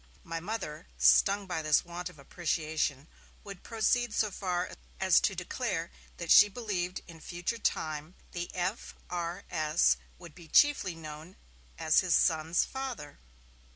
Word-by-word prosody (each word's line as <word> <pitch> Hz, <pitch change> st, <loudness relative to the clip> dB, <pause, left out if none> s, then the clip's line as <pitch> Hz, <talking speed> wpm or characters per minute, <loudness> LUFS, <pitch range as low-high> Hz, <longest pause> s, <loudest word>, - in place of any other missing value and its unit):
My 165 Hz, 0 st, -4 dB
Mother, 180 Hz, -4 st, -5 dB
stung 200 Hz, 0 st, +5 dB
by 180 Hz, -4 st, -3 dB
this 155 Hz, +1 st, +3 dB
want 175 Hz, 0 st, -6 dB
of -, -, -16 dB
appreciation, 155 Hz, -1 st, -2 dB, 0.4 s
would 200 Hz, -2 st, -9 dB
proceed 235 Hz, 0 st, 0 dB
so 215 Hz, -2 st, +1 dB
far 180 Hz, -2 st, -2 dB, 0.3 s
as 190 Hz, -2 st, +5 dB
to 195 Hz, -, 0 dB
declare 180 Hz, -1 st, -3 dB, 0.3 s
that 170 Hz, -2 st, -3 dB
she 210 Hz, -, +9 dB
believed 190 Hz, -5 st, -3 dB
that -, -, -28 dB
in 165 Hz, -2 st, -12 dB
future 175 Hz, +8 st, -4 dB
times 155 Hz, -3 st, -2 dB, 0.2 s
the 175 Hz, 0 st, -4 dB
F.R.S. 175 Hz, -4 st, -1 dB, 0.2 s
would 170 Hz, -3 st, -12 dB
be 170 Hz, 0 st, -14 dB
chiefly 210 Hz, -, +4 dB
known 155 Hz, +2 st, -9 dB, 0.4 s
as 155 Hz, -, +4 dB
his 180 Hz, -3 st, +2 dB
son's 160 Hz, 0 st, +2 dB
father! 255 Hz, -, -6 dB
175 Hz, 140 wpm, -30 LUFS, 160-195 Hz, 0.4 s, she